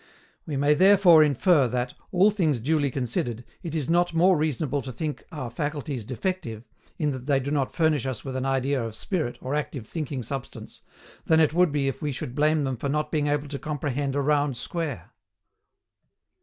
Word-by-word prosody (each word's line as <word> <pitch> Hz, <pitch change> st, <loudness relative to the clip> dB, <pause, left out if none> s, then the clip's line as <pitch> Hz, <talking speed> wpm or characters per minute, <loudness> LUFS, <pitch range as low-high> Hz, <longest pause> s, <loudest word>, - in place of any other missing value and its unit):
We 145 Hz, -3 st, -2 dB
may 145 Hz, +2 st, +4 dB
therefore 185 Hz, -2 st, +7 dB
infer 150 Hz, 0 st, +3 dB
that, 125 Hz, +1 st, -2 dB, 0.2 s
all 190 Hz, +4 st, +5 dB
things 160 Hz, -, +1 dB
duly 145 Hz, +3 st, +1 dB
considered, 120 Hz, -2 st, -3 dB, 0.2 s
it 165 Hz, -2 st, -5 dB
is 150 Hz, -5 st, -1 dB
not 175 Hz, 0 st, +2 dB
more 180 Hz, +3 st, +5 dB
reasonable 150 Hz, -2 st, -1 dB
to 130 Hz, -, -7 dB
think 150 Hz, +4 st, -4 dB
our 130 Hz, -7 st, -5 dB
faculties 145 Hz, -1 st, -3 dB
defective, 130 Hz, -, -4 dB, 0.3 s
in 150 Hz, -3 st, 0 dB
that 130 Hz, -1 st, -7 dB
they 140 Hz, -2 st, +3 dB
do 140 Hz, +2 st, -4 dB
not 140 Hz, -3 st, 0 dB
furnish 155 Hz, -6 st, +1 dB
us 130 Hz, -4 st, -4 dB
with 130 Hz, -1 st, -5 dB
an 130 Hz, -, -2 dB
idea 135 Hz, -1 st, 0 dB
of 115 Hz, -1 st, -5 dB
spirit 160 Hz, -, -2 dB
or 130 Hz, -, -4 dB
active 140 Hz, -6 st, -3 dB
thinking 145 Hz, -4 st, -4 dB
substance, 135 Hz, +1 st, -7 dB, 0.4 s
than 160 Hz, -1 st, +4 dB
it 155 Hz, -2 st, +3 dB
would 180 Hz, -1 st, +3 dB
be 140 Hz, -2 st, 0 dB
if 135 Hz, -, -3 dB
we 150 Hz, -2 st, -1 dB
should 125 Hz, -2 st, -5 dB
blame 150 Hz, +2 st, +2 dB
them 130 Hz, -2 st, -2 dB
for 140 Hz, -, -3 dB
not 150 Hz, +1 st, -1 dB
being 150 Hz, -2 st, +1 dB
able 145 Hz, 0 st, 0 dB
to 140 Hz, -1 st, -5 dB
comprehend 145 Hz, -2 st, -2 dB
a 145 Hz, -, +1 dB
round 145 Hz, -2 st, +1 dB
square. 155 Hz, 0 st, -4 dB
145 Hz, 195 wpm, -26 LUFS, 130-155 Hz, 0.4 s, therefore